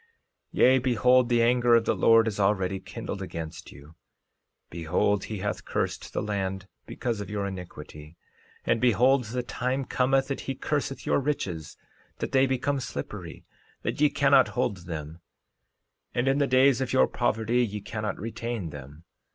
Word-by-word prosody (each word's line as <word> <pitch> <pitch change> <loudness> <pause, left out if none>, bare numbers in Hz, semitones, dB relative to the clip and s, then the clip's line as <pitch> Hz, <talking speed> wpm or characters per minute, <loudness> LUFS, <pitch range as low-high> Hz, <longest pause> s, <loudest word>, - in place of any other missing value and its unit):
13:30 - - -4
Yea, 130 +1 +7
behold, 125 0 +3
the 120 -1 +3
anger 120 0 +4
of 115 -1 +3
the - - +2
Lord 115 0 +5
is 105 -2 -3
already 95 -1 +1
kindled - - -6
against 80 0 -7
you; 70 +3 -14 0.8
behold, 90 +4 0
he 110 - -5
hath 100 -1 -3
cursed - - -3
the - - -2
land 95 -2 -3 0.2
because 115 -4 -3
of 100 - -7
your 105 -1 -2
iniquity. 85 -4 -9 0.5
13:31 - - +1
And 115 - +2
behold, 125 +3 +4
the 125 +3 -3
time 125 +3 -2
cometh 135 +1 +1
that 140 - -2
he 135 - -1
curseth 140 0 -3
your - - +2
riches, 95 - -3 0.4
that - - -4
they 135 0 +4
become 135 +2 0
slippery, 120 - -7 0.4
that - - -3
ye 150 - +6
cannot 140 -2 +4
hold 100 -8 -1
them; 80 -1 -6 1.0
and 120 +2 +1
in 135 +1 +2
the 140 - +2
days 130 0 +4
of 130 - -2
your 65 - +5
poverty 115 +3 +1
ye 105 -2 -3
cannot 105 +1 -4
retain 115 -5 -4
them. 70 +3 -11
115 Hz, 165 wpm, -27 LUFS, 95-130 Hz, 1.0 s, Yea